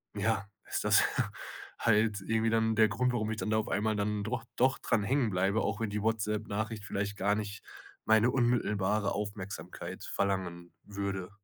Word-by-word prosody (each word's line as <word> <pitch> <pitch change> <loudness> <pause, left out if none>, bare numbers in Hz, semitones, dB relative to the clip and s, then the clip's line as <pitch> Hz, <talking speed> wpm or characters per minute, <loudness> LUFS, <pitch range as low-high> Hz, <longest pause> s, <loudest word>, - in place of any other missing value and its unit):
ja 105 0 0 0.2
ist - - -1
das - - +6 0.8
halt 105 -2 +3
irgendwie 115 +2 +1
dann 110 0 +2
der 110 0 +6
Grund, 125 +4 +1
warum 110 -2 -1
ich 110 - -3
dann 110 - -2
da 110 - +2
auf 110 - -1
einmal 110 +2 +1
dann 105 0 -1
doch 110 +2 -3
doch 130 +1 +3
dran 110 -3 +1
hängen 125 +2 +2
bleibe, 95 +3 +1
auch 105 +1 -1
wenn 110 - 0
die 105 0 -2
WhatsApp-Nachricht 110 0 -1
vielleicht 100 0 -3
gar 100 +2 +2
nicht 105 0 -4 0.4
meine 110 +2 +5
unmittelbare 105 -5 +1
Aufmerksamkeit 100 -1 -5
verlangen 90 -3 -2
würde. 100 -2 -4
105 Hz, 170 wpm, -31 LUFS, 100-110 Hz, 0.8 s, das